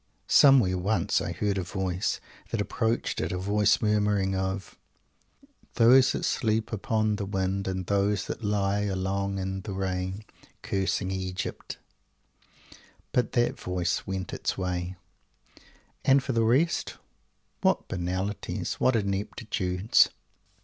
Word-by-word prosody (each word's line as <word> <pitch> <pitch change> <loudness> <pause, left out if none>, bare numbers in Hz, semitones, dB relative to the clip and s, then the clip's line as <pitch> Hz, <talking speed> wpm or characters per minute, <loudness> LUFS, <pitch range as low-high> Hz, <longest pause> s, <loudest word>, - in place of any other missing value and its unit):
Somewhere, 120 -10 +6
once, 100 +5 +1
I - - -3
heard 100 -2 -1
a - - -2
voice 95 +1 -2 0.3
that 115 - -2
approached 115 +2 -1
it; - - -2
a 90 - -2
voice 105 +3 +2
murmuring 105 -2 +2
of 95 +1 -3 1.0
"Those 130 +2 +6
that - - -2
sleep 110 -1 0
upon 110 0 0
the 100 - -3
wind, 95 0 -1
And 95 -1 -2
those 100 +1 +1
that - - -6
lie 100 -1 +1
along 100 0 -1
in 95 0 -3
the 100 - -6
rain, 95 +1 -3 0.4
Cursing 95 -1 -1
Egypt 95 -1 -4 0.7
" - - -25
But 125 - +1
that 120 -1 +1
voice 90 -1 -2
went 95 -1 -4
its - - -2
way; 90 -1 -3 1.1
and 135 0 +4
for 135 - -2
the 115 -2 +2
rest 145 +9 +1 0.7
what - - +2
banalities! 95 +3 -3
What 130 - +3
ineptitudes! 100 -1 +1
100 Hz, 130 wpm, -27 LUFS, 95-110 Hz, 1.1 s, Somewhere